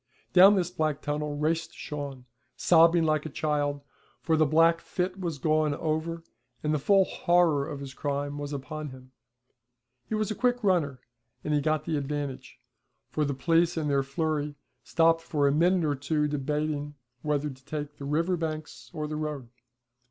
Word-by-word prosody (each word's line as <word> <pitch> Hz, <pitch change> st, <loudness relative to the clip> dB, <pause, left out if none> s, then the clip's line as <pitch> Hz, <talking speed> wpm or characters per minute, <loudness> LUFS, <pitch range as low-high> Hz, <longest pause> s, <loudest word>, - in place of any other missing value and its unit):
Down 190 Hz, +3 st, +8 dB
this 180 Hz, -2 st, 0 dB
black 155 Hz, -4 st, -1 dB
tunnel 150 Hz, 0 st, -2 dB
raced 160 Hz, +2 st, -1 dB
Shawn, 140 Hz, -4 st, -6 dB, 0.3 s
sobbing 165 Hz, 0 st, +5 dB
like 155 Hz, -2 st, +1 dB
a -, -, -7 dB
child, 145 Hz, -1 st, -1 dB, 0.4 s
for 160 Hz, -, +1 dB
the 155 Hz, -1 st, +3 dB
black 165 Hz, +2 st, +4 dB
fit 185 Hz, +1 st, -3 dB
was 170 Hz, -5 st, -3 dB
gone 155 Hz, 0 st, +1 dB
over 165 Hz, +2 st, -2 dB, 0.4 s
and 150 Hz, 0 st, +1 dB
the 150 Hz, -, +1 dB
full 195 Hz, +6 st, +4 dB
horror 170 Hz, -7 st, +2 dB
of 145 Hz, -2 st, -6 dB
his 135 Hz, -2 st, -7 dB
crime 145 Hz, +1 st, -3 dB
was 145 Hz, 0 st, -5 dB
upon 145 Hz, +2 st, -5 dB
him. 130 Hz, 0 st, -13 dB, 1.0 s
He 220 Hz, -, -1 dB
was 215 Hz, -1 st, -1 dB
a -, -, -2 dB
quick 245 Hz, 0 st, +1 dB
runner, 155 Hz, -10 st, +1 dB, 0.4 s
and 150 Hz, -, -1 dB
he 145 Hz, -, +2 dB
got 155 Hz, 0 st, 0 dB
the 155 Hz, -, -1 dB
advantage, 140 Hz, -2 st, -4 dB, 0.5 s
for 150 Hz, -, 0 dB
the 140 Hz, -1 st, -2 dB
police 165 Hz, +5 st, +2 dB
in 155 Hz, -2 st, -1 dB
their 140 Hz, -1 st, +3 dB
flurry 150 Hz, +1 st, -2 dB, 0.3 s
stopped 165 Hz, 0 st, +3 dB
for 150 Hz, -3 st, +1 dB
a -, -, +3 dB
minute 175 Hz, +3 st, +3 dB
or 145 Hz, -, +1 dB
two 150 Hz, +2 st, 0 dB
debating 150 Hz, 0 st, -2 dB, 0.3 s
whether 150 Hz, -1 st, -1 dB
to 130 Hz, 0 st, -15 dB
take 150 Hz, -1 st, -5 dB
the 140 Hz, -, -7 dB
river 165 Hz, +6 st, +1 dB
banks 155 Hz, -7 st, -5 dB
or 155 Hz, -1 st, -2 dB
the 155 Hz, 0 st, -4 dB
road. 150 Hz, -5 st, -4 dB
150 Hz, 175 wpm, -28 LUFS, 145-165 Hz, 1.0 s, Down